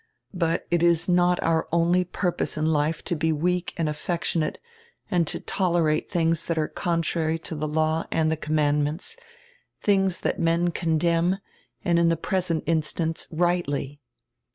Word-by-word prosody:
But 170 -2 0
it 175 -1 +2
is 170 0 +3
not 180 0 +3
our 165 -1 +1
only 170 +2 +3
purpose 180 -2 -2
in 155 - 0
life 155 0 +1
to 175 - -2
be 160 +1 +1
weak 175 +3 0
and 165 -2 0
affectionate 155 +1 -1 0.5
and 175 -4 +2
to - - -2
tolerate 170 -5 0
tilings 165 -2 +1
diat 170 - -1
are 155 -1 +1
contrary 165 -1 -1
to 165 - -7
die 150 0 -2
law 155 +1 0
and 160 -1 +1
die - - +1
commandments, 150 +1 0 0.7
tilings 195 -3 +2
diat - - -1
men 170 +1 +2
condemn, 170 +2 +1 0.5
and 170 -1 +3
in 170 0 +4
die 165 - +3
present 170 -1 -1
instance 160 0 0
rightiy." 160 -4 -1
165 Hz, 155 wpm, -25 LUFS, 155-175 Hz, 0.7 s, in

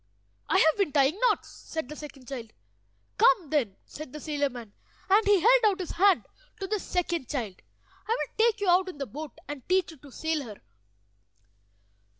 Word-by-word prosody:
"I - - +4
have 315 -4 +4
been 395 -7 +1
tying 285 +6 +3
knots," - - -1
said 320 -5 -6
the 300 - -8
second 285 -4 -11
child. 235 -5 -7 0.7
"Come, 385 - +4
then," 245 -11 +1
said 305 -3 -9
the 300 - -7
sailor 290 -2 -1
man, 235 -5 -10 0.3
and 405 +2 +4
he 405 -3 +5
held - - +5
out 405 -3 +3
his 365 - -4
hand 385 +1 +4 0.3
to 390 - -3
the 420 +2 -1
second 345 -7 -2
child. 225 -10 -4 0.5
"I 455 +2 +1
will - - -4
take 450 -1 +3
you 405 - -1
out 365 +1 +4
in 360 - -9
the 280 - -3
boat, 290 +4 -8
and 290 -2 -6
teach 370 -2 +2
you 320 - -14
to 275 +1 -15
sail 320 +2 -1
her." 215 -5 -10
315 Hz, 190 wpm, -28 LUFS, 275-380 Hz, 0.7 s, he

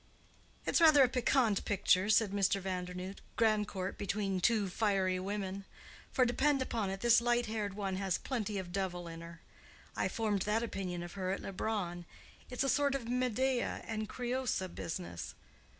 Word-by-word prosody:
"It's - - +2
rather 310 -4 +8
a - - +5
piquant 245 -4 +2
picture," 190 0 +2
said 215 -1 +4
Mr. 200 0 +2
Vandernoodt—"Grandcourt 190 +2 -2
between 195 -2 -1
two 215 -1 +3
fiery 190 -2 +1
women. 195 0 -3 0.5
For 255 - +3
depend 275 +4 +2
upon 230 -6 -1
it 195 +1 -4
this 235 0 +5
light 240 0 +2
haired 215 -3 -3
one 195 -2 -2
has 190 -2 0
plenty 215 -6 -3
of 185 -2 -5
devil 180 -2 -2
in 165 0 -8
her. 170 -1 -11 0.5
I - - +1
formed 210 -4 0
that 215 +4 +1
opinion 185 -6 -4
of 175 - -8
her 185 -2 -3
at 190 - -1
Leubronn. 185 -3 -3 0.4
It's 250 +1 -1
a - - 0
sort 280 0 +2
of 250 -4 -4
Medea 250 +1 0
and 215 -1 -3
Creüsa 245 -7 -2
business. 160 - -5
205 Hz, 160 wpm, -33 LUFS, 185-235 Hz, 0.5 s, rather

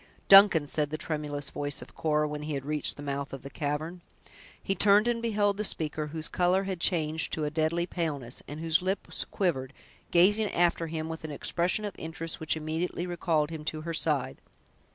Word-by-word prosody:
"Duncan!" 195 -6 +8
said 145 +1 0
the 155 - -3
tremulous 150 -2 -2
voice 145 -1 -2
of - - -10
Cora, 150 -1 +1
when 150 0 -5
he 150 0 -3
had 135 -1 -4
reached 150 0 -1
the 145 - -8
mouth 140 0 -3
of 135 - -7
the 140 - -8
cavern. 155 +4 -3 0.6
He 195 - -1
turned 205 +3 +5
and 235 -1 0
beheld 205 -3 +1
the 210 - -1
speaker, 155 -5 -1
whose 160 +1 -3
color 180 +2 +2
had 190 -2 -4
changed 160 -3 +1
to 155 - -1
a 150 - -1
deadly 160 +2 0
paleness, 145 -9 -3
and 145 +2 -7
whose 165 +1 +2
lips 190 +2 -2
quivered, 135 -9 -1 0.4
gazing 205 +5 +4
after 170 -1 +2
him, 160 0 -4
with 160 0 -6
an 155 - -5
expression 175 +7 0
of 205 - -4
interest 165 0 -5
which 160 0 0
immediately 160 +3 -2
recalled 165 -3 0
him 160 -2 -6
to 155 0 -2
her 165 +1 -4
side. 150 -4 -1
160 Hz, 195 wpm, -29 LUFS, 150-180 Hz, 0.6 s, Duncan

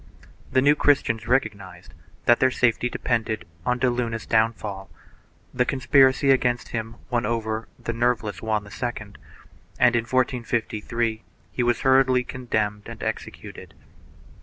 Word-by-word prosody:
The 130 - +3
New 145 +1 +6
Christians 125 -7 +1
recognized 105 -7 -2 0.3
that 120 - +5
their 130 - +4
safety 125 -1 +1
depended 110 -6 -2 0.2
on 125 0 +2
de 130 - +1
Luna's 120 -2 -2
downfall; 110 -3 0 0.6
the 125 - +2
conspiracy 135 +1 +3
against 125 -2 +1
him 115 0 -4 0.2
won 120 -1 +1
over 110 0 -2
the 115 - -4
nerveless 115 -3 -1
Juan 110 -2 -1
II 120 +4 -3 0.9
and, 125 -1 +4
in 115 -1 +1
1453, 115 -2 -1 0.3
he - - -2
was 120 -1 +1
hurriedly 130 -1 +4
condemned 110 -5 -3
and - - -8
executed. - - -6
120 Hz, 130 wpm, -24 LUFS, 110-125 Hz, 0.9 s, New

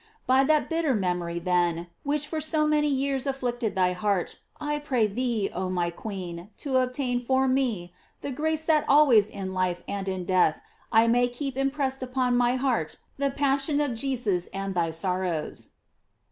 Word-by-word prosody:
By 260 +1 +4
that 305 +1 +3
bitter 325 -5 +1
mem 180 -3 0
ory, 170 0 -4
then, 175 -1 +1 0.2
which 295 +1 +1
for 310 +1 -3
so 310 0 +1
many 300 0 +2
years 275 -1 0
afflicted 245 -4 -2
thy 180 -1 +2
heart, 195 -1 -1 0.2
I 295 0 -2
pray 260 -6 +1
thee, 225 -1 -1
oh 185 +1 -2
my 175 -2 -1
queen, 180 -2 -7
to 270 -3 -1
obtain 250 -1 0
for 265 +2 +2
me 235 -10 0 0.3
the 285 - -4
grace 315 +3 -1
that 310 -2 +3
always 260 -8 +6
in 190 -1 -5
life 180 -1 -1
and 195 -1 -3
in 185 -1 -3
death 180 -4 +3 0.3
I 225 +1 +5
may 245 +1 +3
keep 265 +2 -5
impressed 270 0 -1
upon 255 -1 0
my 245 0 +3
heart 250 - 0 0.2
the 280 0 +2
passion 280 +1 +1
of 290 -4 0
Jesus 230 -8 -1
and 195 0 -4
thy 170 -2 +1
sorrows. 175 -1 -2
245 Hz, 175 wpm, -26 LUFS, 185-275 Hz, 0.3 s, always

